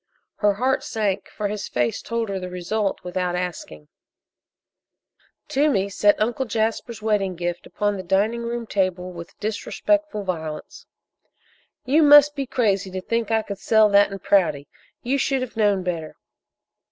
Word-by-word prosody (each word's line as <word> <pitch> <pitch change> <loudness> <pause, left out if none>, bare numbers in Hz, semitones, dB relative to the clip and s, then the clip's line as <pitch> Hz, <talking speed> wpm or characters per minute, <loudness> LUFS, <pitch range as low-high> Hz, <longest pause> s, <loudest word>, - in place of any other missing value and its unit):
Her 205 -1 +2
heart 260 +5 0
sank, 200 -3 -2
for 210 - -3
his 205 0 -4
face 120 -2 -1
told 230 -2 -3
her 195 -1 -2
the 180 0 -6
result 195 +3 -2
without 180 0 -2
asking. 165 - -5 1.6
Toomey 265 -9 +1
set 205 +1 +3
Uncle 240 +5 0
Jasper's 225 +1 -2
wedding 200 -4 0
gift 175 0 -4
upon 205 -1 -1
the - - -4
dining 200 +6 +1
room 235 0 -4
table 185 -3 -1
with 170 -1 -11
disrespectful 220 +3 -1
violence. 160 -5 -6 1.0
"You 285 +5 +4
must 295 0 +7
be 275 -2 -3
crazy 200 -6 0
to 185 0 -4
think 230 +2 -1
I 220 -1 +2
could 200 -2 -7
sell 220 +1 +4
that 200 0 +5
in 195 - -5
Prouty! 170 -8 +1 0.4
You 270 +3 0
should 270 -1 0
have 250 - -8
known 205 -4 +2
better!" 165 -4 -4
205 Hz, 155 wpm, -23 LUFS, 185-230 Hz, 1.6 s, must